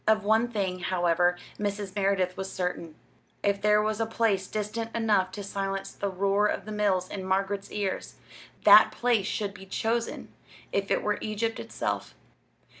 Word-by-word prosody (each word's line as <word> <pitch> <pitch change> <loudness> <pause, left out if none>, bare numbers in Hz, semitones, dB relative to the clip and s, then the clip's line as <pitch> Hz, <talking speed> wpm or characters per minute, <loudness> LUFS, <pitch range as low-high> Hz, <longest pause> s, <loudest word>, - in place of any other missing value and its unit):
Of 215 -1 +4
one 220 +3 +3
thing, 195 -6 -2
however, 175 -1 +2 0.2
Mrs. 205 -1 -3
Merideth 195 -2 +1
was 190 0 -5
certain 180 -3 -3 0.5
if 200 0 +1
there 210 0 +4
was 215 0 -1
a 225 - 0
place 215 -4 +1
distant 215 +2 -3
enough 210 -5 +2
to 205 - -5
silence 195 0 -3
the 200 - -3
roar 200 +2 +2
of - - -2
the 215 - -7
mills 200 -3 +1
in 190 0 -6
Margaret's 195 +1 -1
ears, 200 -2 -3 0.5
that - - +9
place 235 -5 +1
should 205 -2 -2
be 195 - -12
chosen 230 +4 -2 0.4
if 200 0 -1
it - - +1
were 210 0 0
Egypt 220 +1 -2
itself. - - -4
200 Hz, 165 wpm, -28 LUFS, 190-215 Hz, 0.5 s, that